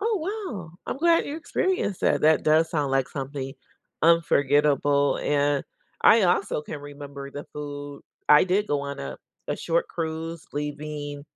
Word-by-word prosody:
Oh, 445 Hz, 0 st, +1 dB, 0.4 s
wow. 165 Hz, -4 st, -9 dB
I'm -, -, -3 dB
glad 335 Hz, +1 st, +4 dB
you 290 Hz, -, -4 dB
experienced 340 Hz, -, -1 dB
that. -, -, +2 dB
That 155 Hz, -1 st, +5 dB
does 160 Hz, +1 st, +4 dB
sound 145 Hz, -4 st, 0 dB
like 135 Hz, -1 st, +2 dB
something 135 Hz, -1 st, -5 dB, 0.5 s
unforgettable, 145 Hz, -3 st, +3 dB
and 145 Hz, -1 st, +1 dB, 0.4 s
I 225 Hz, 0 st, +7 dB
also 185 Hz, -3 st, +1 dB
can 150 Hz, -, -7 dB
remember 140 Hz, -1 st, -9 dB
the 145 Hz, +1 st, -7 dB
food 145 Hz, -1 st, -7 dB, 0.3 s
I 150 Hz, 0 st, +8 dB
did 195 Hz, +3 st, +1 dB
go 145 Hz, -1 st, 0 dB
on 140 Hz, 0 st, -5 dB
a 65 Hz, -1 st, -5 dB, 0.3 s
a -, -, -1 dB
short 170 Hz, 0 st, 0 dB
cruise 165 Hz, 0 st, -4 dB
leaving 145 Hz, 0 st, -4 dB
150 Hz, 155 wpm, -25 LUFS, 145-170 Hz, 0.5 s, I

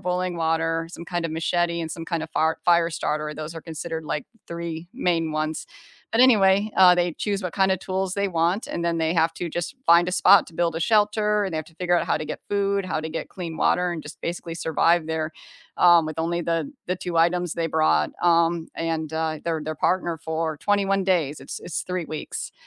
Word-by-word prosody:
boiling 180 Hz, 0 st, -1 dB
water, 165 Hz, 0 st, 0 dB
some 170 Hz, 0 st, -9 dB
kind 175 Hz, -2 st, -2 dB
of 165 Hz, -, -2 dB
machete, 170 Hz, +1 st, 0 dB
and 160 Hz, -1 st, -4 dB
some 165 Hz, +1 st, -6 dB
kind 165 Hz, -1 st, -2 dB
of 160 Hz, -, -6 dB
fire 160 Hz, 0 st, +1 dB
fire 170 Hz, -1 st, +4 dB
starter, 150 Hz, -1 st, -2 dB
those 155 Hz, +2 st, -6 dB
are 165 Hz, -, -8 dB
considered 160 Hz, 0 st, -5 dB
like 150 Hz, -1 st, -3 dB, 0.2 s
3 170 Hz, 0 st, -6 dB
main 170 Hz, -, 0 dB
ones, 155 Hz, 0 st, -2 dB, 0.4 s
but 225 Hz, -, +2 dB
anyway, 205 Hz, -4 st, +5 dB
uh, 180 Hz, -1 st, +8 dB
they 175 Hz, -2 st, 0 dB
choose 200 Hz, -1 st, -2 dB
what 180 Hz, -2 st, -4 dB
kinda 190 Hz, -2 st, +2 dB
tools 190 Hz, 0 st, -2 dB
they 200 Hz, 0 st, 0 dB
want 170 Hz, +4 st, 0 dB
and 170 Hz, -, -4 dB
then 170 Hz, -1 st, 0 dB
they 160 Hz, +1 st, 0 dB
have 165 Hz, -1 st, +2 dB
to 175 Hz, -, -4 dB
just 175 Hz, -, -4 dB
find 170 Hz, +1 st, +6 dB
a 180 Hz, -, -2 dB
spot 190 Hz, +1 st, +6 dB
to -, -, -14 dB
build 165 Hz, -1 st, 0 dB
a -, -, -3 dB
shelter 210 Hz, +1 st, +2 dB
and 190 Hz, -4 st, -4 dB
they -, -, 0 dB
have 155 Hz, -, -3 dB
to 160 Hz, -, -19 dB
figure 175 Hz, 0 st, +1 dB
out -, -, 0 dB
how -, -, +1 dB
to 155 Hz, -, -5 dB
get 150 Hz, -, -5 dB
food, 200 Hz, -1 st, 0 dB
how 180 Hz, -4 st, -2 dB
to 160 Hz, -, -5 dB
get 160 Hz, -, -5 dB
clean 170 Hz, -4 st, -6 dB
water, 180 Hz, +2 st, +2 dB
and 165 Hz, -3 st, -4 dB
just 145 Hz, 0 st, -11 dB
basically 170 Hz, -1 st, -4 dB
survive 165 Hz, 0 st, +2 dB
there, 160 Hz, 0 st, -2 dB, 0.5 s
um, 175 Hz, -2 st, +6 dB
with 155 Hz, 0 st, -6 dB
only 170 Hz, +1 st, -1 dB
the 165 Hz, +10 st, -1 dB, 0.2 s
the 180 Hz, -, 0 dB
2 175 Hz, -1 st, -4 dB
items 175 Hz, +1 st, +2 dB
they 165 Hz, -1 st, -1 dB
brought, 155 Hz, 0 st, +2 dB
um, 170 Hz, -1 st, +3 dB
and, 160 Hz, -1 st, -3 dB
uh, 160 Hz, -1 st, -1 dB
their 160 Hz, -2 st, -1 dB
their 155 Hz, +1 st, -3 dB
partner 170 Hz, +1 st, 0 dB
for 160 Hz, -1 st, -2 dB
21 195 Hz, +1 st, +1 dB
days, 165 Hz, -6 st, +1 dB
it's -, -, -7 dB
it's 175 Hz, -, -4 dB
3 180 Hz, -1 st, -3 dB
weeks. 155 Hz, -1 st, -6 dB
170 Hz, 225 wpm, -24 LUFS, 160-180 Hz, 0.5 s, uh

